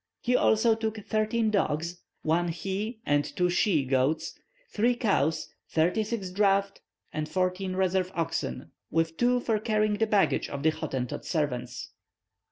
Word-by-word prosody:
He 250 +1 +1
also 225 0 +4
took 220 0 -2
thirteen 215 +1 +1
dogs, 170 -3 -1 0.2
one 170 +2 +2
he 195 +7 -3
and 145 0 +3
two 180 +3 0
she 175 -6 +2
goats, 135 +4 +1 0.4
three 240 +3 +2
cows, 165 - +1 0.2
thirty 175 +7 +2
six 205 -4 -4
draught 195 0 +2 0.3
and 155 0 -3
fourteen 185 0 -1
reserve 185 0 +1
oxen, 160 - -3 0.2
with 165 0 0
two 245 +5 +3
for 225 -3 0
carrying 215 -1 +1
the 225 - +2
baggage 205 -2 +2
of 140 0 -5
the 160 - +4
Hottentot 130 -5 -4
servants. 125 -7 -3
185 Hz, 145 wpm, -28 LUFS, 160-215 Hz, 0.4 s, also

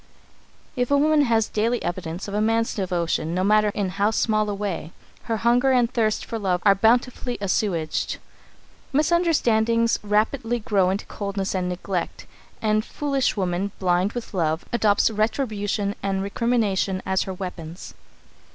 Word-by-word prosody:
If 245 -1 0
a 285 - +4
woman 300 0 +4
has 225 -3 +2
daily 230 +3 0
evidence 175 +1 -4
of 200 - -6
a 210 - +1
man's 225 +1 +1
devotion, 170 -4 -1
no 185 - +1
matter 210 +1 +4
in 200 -2 -1
how 200 +3 +1
small 215 -1 +1
a - - -1
way, 195 -5 -4 0.3
her 225 - -1
hunger 245 +4 +3
and 245 -1 +2
thirst 220 -3 0
for 225 - -4
love 185 -3 0
are 200 - +7
bountifully 240 +4 +1
assuaged. 185 -5 -1 0.7
Misunderstandings 240 -8 +2
rapidly 225 +4 0
grow 200 -5 +1
into 195 +3 -2
coldness 200 -1 -3
and 180 -1 -1
neglect, 180 0 -4 0.4
and 215 0 +2
foolish 275 -2 -1
woman, 190 +1 -1
blind 185 +2 +1
with 240 -3 -6
love, 160 -2 0
adopts 220 -2 +3
retribution 215 -2 -1
and 195 -1 -1
recrimination 200 -3 0
as 190 0 +1
her - - -3
weapons. 180 -2 -7
210 Hz, 150 wpm, -23 LUFS, 190-230 Hz, 0.7 s, are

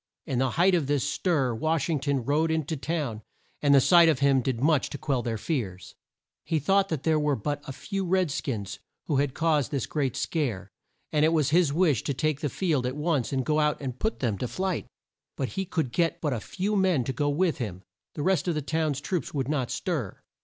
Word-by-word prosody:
In 125 - -1
the 130 0 +2
height 175 +9 +3
of 165 -6 +2
this 145 -1 +1
stir 145 -6 +1
Wash 155 +6 0
ing 160 -4 0
ton 140 -3 -1
rode 155 +4 +2
in 160 -2 0
to 160 - -3
town, 140 -7 -3 0.4
and 145 -1 +5
the - - +8
sight 170 +4 +6
of 155 - +3
him 140 -1 +3
did 125 -2 -2
much 150 +1 +2
to - - -6
quell 135 -4 -1
their 115 -2 -2
fears. 95 - -4 0.5
He 160 - 0
thought 195 +6 +2
that 155 -4 -3
there 160 -1 +3
were 150 -1 +1
but 145 +6 -3
a - - -4
few 195 +8 -4
red 185 -3 +1
skins 105 -8 -4 0.3
who 145 - 0
had 140 -1 0
caused 155 -5 +1
this 140 -4 -2
great 140 -5 -1
scare, 110 - -2 0.4
and 150 -1 +2
it 160 - +4
was 155 -3 +2
his 170 -2 +4
wish 155 - +2
to 140 - -1
take 155 0 0
the 145 - -1
field 150 -6 0
at 130 +3 -4
once 150 -5 0
and 130 -2 -1
go 155 0 +2
out 150 -1 +1
and 130 -3 -5
put 220 - -2
them 110 -7 0
to 125 - -2
flight. 185 +5 -2 0.5
But 135 - -1
he 195 0 -3
could 160 -8 -2
get 165 +2 0
but 150 -4 -1
a 120 - -2
few 195 - -2
men 185 -9 +2
to 130 - -3
go 145 +4 0
with 160 +3 +1
him. 95 -6 -5 0.3
The 145 - -3
rest 185 -2 +1
of 170 - +1
the 150 - -1
town 160 0 0
troops 150 +4 -3
would 135 -1 -1
not 135 -5 0
stir. 155 - -3
145 Hz, 235 wpm, -27 LUFS, 130-165 Hz, 0.5 s, the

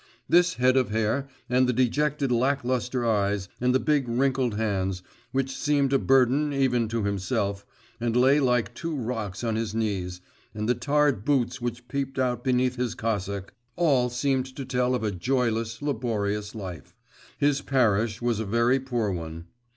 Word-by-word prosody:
This 180 +1 +4
head 130 +1 +3
of 130 -4 +2
hair, 115 +5 0 0.2
and 125 +1 +3
the - - +2
dejected 140 +3 +1
lack 135 +4 +1
lustre 125 0 -1
eyes, 100 -3 +1
and 125 +1 +2
the 130 - +3
big 145 -4 +1
wrinkled 130 -1 +1
hands, 95 -4 -1 0.3
which 135 0 -1
seemed 145 -2 +1
a 135 - +4
burden 135 +3 +3
even 130 -4 +1
to 115 0 -2
himself, 100 0 -2 0.3
and 120 0 0
lay 135 +4 +5
like 125 -3 +1
two 165 +5 -4
rocks 115 -6 -4
on 115 -2 0
his 110 -1 -2
knees, 95 -5 -2 0.4
and 105 0 -2
the 125 - +4
tarred 140 -2 +1
boots 130 -4 0
which 120 0 -4
peeped 135 +1 -3
out 125 -2 0
beneath 125 0 +1
his 125 -2 -2
cassock, 100 -3 -3 0.2
all 140 -8 +3
seemed 130 +1 0
to 135 - -5
tell 125 0 +1
of 125 - -3
a 105 - 0
joyless 115 +2 -1
laborious 105 -6 -2
life. 90 - -8 0.4
His 145 -1 +2
parish 115 -4 +1
was 120 -3 +1
a 110 - -2
very 115 +5 +2
poor 120 -6 -1
one. 85 -2 -6
125 Hz, 170 wpm, -26 LUFS, 110-135 Hz, 0.4 s, lay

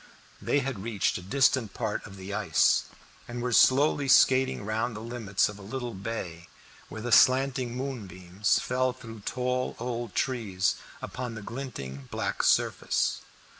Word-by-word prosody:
They 145 - +1
had 130 -7 -4
reached 105 -4 -1
a - - -10
distant 125 +1 +2
part 110 -3 -2
of 95 - -11
the 95 +2 -7
ice, 95 -6 +3 0.4
and 120 +1 -6
were 120 0 -1
slowly 140 +3 +4
skating 130 -4 +4
round 110 +2 -1
the - - -6
limits 115 -3 0
of 105 0 -8
a - - -11
little 120 +4 -5
bay, 95 -4 -6 0.4
where 110 - -7
the 120 - -3
slanting 130 +1 +4
moonbeams 100 -7 -1
fell 130 0 0
through 115 -3 -10
tall 125 0 -1
old 120 -3 -4
trees 105 -8 0 0.3
upon 125 -2 -5
the 110 - -7
glinting 70 - -7
black - - -2
surface. - - +1
115 Hz, 150 wpm, -28 LUFS, 100-130 Hz, 0.4 s, slowly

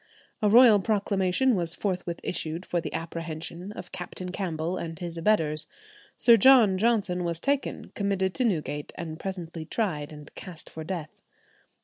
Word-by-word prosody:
A 210 - +3
royal 230 -1 +8
proclamation 200 +3 +1
was 170 -4 -1
forthwith 180 -4 -3
issued 165 +1 -3
for 175 - -1
the - - -5
apprehension 165 +2 -5
of 180 -4 -9
Captain 180 0 -6
Campbell 175 -3 -2
and 165 -3 -5
his 170 -1 -6
abettors. 160 -4 +2 0.5
Sir 235 -2 +7
John 225 -5 +6
Johnson 205 -5 +1
was 170 -1 -2
taken, 280 +6 -1
committed 195 -2 0
to 255 - 0
Newgate, 155 -9 -1
and 160 -2 -6
presently 175 -4 -5
tried 155 -5 -2
and 150 -1 -12
cast 175 -4 -8
for 160 - -7
death. 160 -2 -6
180 Hz, 150 wpm, -27 LUFS, 165-200 Hz, 0.5 s, royal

